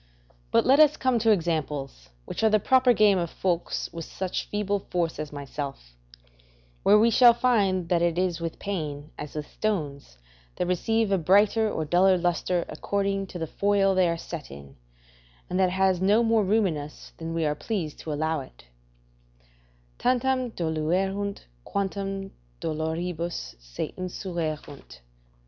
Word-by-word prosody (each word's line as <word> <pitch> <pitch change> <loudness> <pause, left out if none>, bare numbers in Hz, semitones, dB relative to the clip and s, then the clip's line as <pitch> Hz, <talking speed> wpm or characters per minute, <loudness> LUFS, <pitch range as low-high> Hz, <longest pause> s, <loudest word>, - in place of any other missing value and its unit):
But - - +3
let 270 +3 +5
us 305 -1 +6
come 255 -2 +1
to 225 0 +2
examples, 150 - -1 0.2
which - - -5
are 220 - +6
the 215 0 +4
proper 255 +4 +4
game 210 -4 +4
of 170 -1 -2
folks 175 -1 -2
of 165 0 -5
such 185 +3 -4
feeble 205 -1 -1
force 170 -4 -1
as 155 -1 -5
myself; 140 - -7 0.9
where 205 +2 +6
we 230 +2 +4
shall 240 +1 +7
find 200 -8 +2
that 175 -1 +2
it 170 -1 +1
is 180 -2 0
with 165 -1 -4
pain 155 -7 -4
as 150 0 -7
with 150 -1 -3
stones, 150 - -3 0.4
that - - -1
receive 220 +4 0
a 195 - +3
brighter 205 +6 +4
or 160 - -2
a - - -8
duller 185 +3 +4
lustre 175 0 0
according 195 -1 -2
to 180 - -8
the 165 - -2
foil 200 +3 +2
they 185 -2 +3
are 170 - -1
set 165 -2 -7
in, 70 0 -12 0.8
and 180 - 0
that 185 -1 +4
it - - -4
has 190 -1 +2
no 205 +5 +4
more 225 -1 +3
room 210 +2 +2
in 165 -5 -1
us 145 +1 -9
than 165 0 -4
we 165 -1 0
are 150 - +1
pleased 165 -1 -4
to 155 - -6
allow 155 +1 -1
it: 130 - -12 1.4
"Tantum 255 0 +1
doluerunt, 185 +5 -1 0.2
quantum 195 - -3 0.3
doloribus 165 - -3
se - - -6
inseruerunt." 160 - -5
180 Hz, 165 wpm, -26 LUFS, 160-205 Hz, 1.4 s, shall